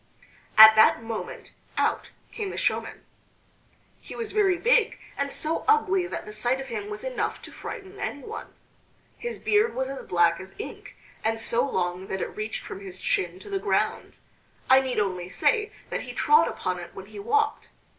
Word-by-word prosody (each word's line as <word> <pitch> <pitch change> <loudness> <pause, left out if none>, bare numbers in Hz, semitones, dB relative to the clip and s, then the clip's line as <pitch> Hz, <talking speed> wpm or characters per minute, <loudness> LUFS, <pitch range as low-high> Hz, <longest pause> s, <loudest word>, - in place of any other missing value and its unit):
At 220 0 +11
that 220 +1 +5
moment 225 -1 -6 0.3
out - - 0 0.2
came 420 -4 -4
the - - -6
showman. - - -2 0.9
He - - -10
was 455 -2 -4
very 390 -4 +3
big 475 +2 +3 0.2
and 280 0 -2
so 315 +1 -1
ugly 390 -4 +3
that - - -5
the 210 - -8
sight 240 +5 0
of 270 0 -7
him 405 - -4
was 420 +2 -6
enough - - -2
to - - -9
frighten 390 0 -8
anyone. 285 -2 -5 0.7
His 475 0 -4
beard 425 +2 +2
was 265 0 -1
as 275 - -5
black 170 -1 +2
as 190 0 -11
ink, 435 - -8 0.3
and 225 +1 +1
so 230 +2 +1
long 180 -1 -2
that 190 - -3
it - - -4
reached 215 +1 -4
from - - -7
his 190 -2 -8
chin 180 -1 -1
to - - -11
the 390 - 0
ground. - - 0 0.6
I 260 - +9
need 260 -2 -3
only 185 -3 -2
say 425 - +1 0.2
that - - -2
he - - -8
trod 450 +1 +5
upon 185 -1 -3
it 175 -1 -10
when 190 - -8
he 210 0 -10
walked. 435 - 0
260 Hz, 185 wpm, -26 LUFS, -, 0.9 s, At